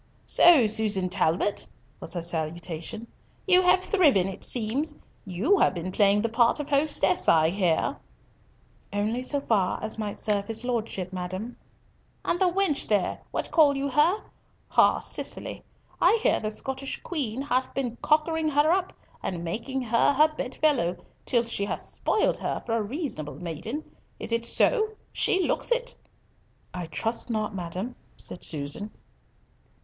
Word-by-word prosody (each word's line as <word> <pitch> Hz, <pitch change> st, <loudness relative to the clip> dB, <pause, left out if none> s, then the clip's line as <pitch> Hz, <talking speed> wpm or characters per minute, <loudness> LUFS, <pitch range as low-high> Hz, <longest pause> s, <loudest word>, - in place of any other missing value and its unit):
"So, 330 Hz, -9 st, +7 dB
Susan 210 Hz, -4 st, +3 dB
Talbot," 185 Hz, +2 st, +1 dB, 0.3 s
was 165 Hz, -, -3 dB
her 170 Hz, -, -2 dB
salutation, 170 Hz, +5 st, -3 dB, 0.4 s
"you 370 Hz, -1 st, +6 dB
have 370 Hz, 0 st, +4 dB
thriven, 290 Hz, -, +3 dB
it 195 Hz, -, -7 dB
seems. 260 Hz, +7 st, 0 dB, 0.3 s
You 215 Hz, -, +1 dB
have -, -, +3 dB
been 175 Hz, +2 st, -4 dB
playing 205 Hz, +1 st, +3 dB
the -, -, +2 dB
part 235 Hz, +4 st, +3 dB
of 295 Hz, -, -4 dB
hostess, 280 Hz, -10 st, +3 dB
I 160 Hz, 0 st, +4 dB
hear." 180 Hz, -4 st, 0 dB, 0.9 s
"Only 215 Hz, +5 st, -1 dB
so 285 Hz, +2 st, 0 dB
far 205 Hz, -9 st, +1 dB
as 220 Hz, -, -3 dB
might 210 Hz, -2 st, -4 dB
serve 205 Hz, -2 st, 0 dB
his 225 Hz, +1 st, -3 dB
Lordship, 215 Hz, -7 st, -3 dB
madam." 185 Hz, +6 st, -5 dB, 0.7 s
"And 345 Hz, -, 0 dB
the 370 Hz, -2 st, +3 dB
wench, 370 Hz, -6 st, +1 dB
there, 205 Hz, -3 st, 0 dB
what -, -, -4 dB
call 295 Hz, -4 st, +4 dB
you 280 Hz, +1 st, -1 dB
her? 315 Hz, +10 st, +2 dB, 0.5 s
Ay, -, -, +5 dB
Cicely. -, -, -5 dB, 0.4 s
I 460 Hz, -, +5 dB
hear -, -, +3 dB
the 215 Hz, -, -3 dB
Scottish 265 Hz, +4 st, -4 dB
Queen 270 Hz, -7 st, -3 dB
hath 255 Hz, -2 st, 0 dB
been 245 Hz, -3 st, -2 dB
cockering 315 Hz, +2 st, +1 dB
her 295 Hz, +2 st, +3 dB
up 370 Hz, +1 st, 0 dB, 0.3 s
and 175 Hz, -2 st, -4 dB
making 245 Hz, +10 st, -3 dB
her 235 Hz, +4 st, +3 dB
her 305 Hz, +3 st, +4 dB
bedfellow, 255 Hz, -, 0 dB, 0.3 s
till 235 Hz, -2 st, +2 dB
she 215 Hz, -3 st, -2 dB
hath -, -, -4 dB
spoilt 430 Hz, -, 0 dB
her -, -, -3 dB
for 230 Hz, -, -1 dB
a 230 Hz, -, +1 dB
reasonable 210 Hz, -, -5 dB
maiden. 180 Hz, -, -5 dB, 0.4 s
Is -, -, -5 dB
it 230 Hz, 0 st, 0 dB
so? 435 Hz, -3 st, +3 dB, 0.2 s
She 380 Hz, -2 st, +2 dB
looks -, -, 0 dB
it." -, -, 0 dB, 0.8 s
"I 180 Hz, -2 st, -5 dB
trust 225 Hz, +9 st, -3 dB
not, 215 Hz, -2 st, -2 dB
madam," 185 Hz, +6 st, -5 dB, 0.2 s
said -, -, -6 dB
Susan. 150 Hz, +7 st, -2 dB
230 Hz, 155 wpm, -26 LUFS, 190-295 Hz, 0.9 s, So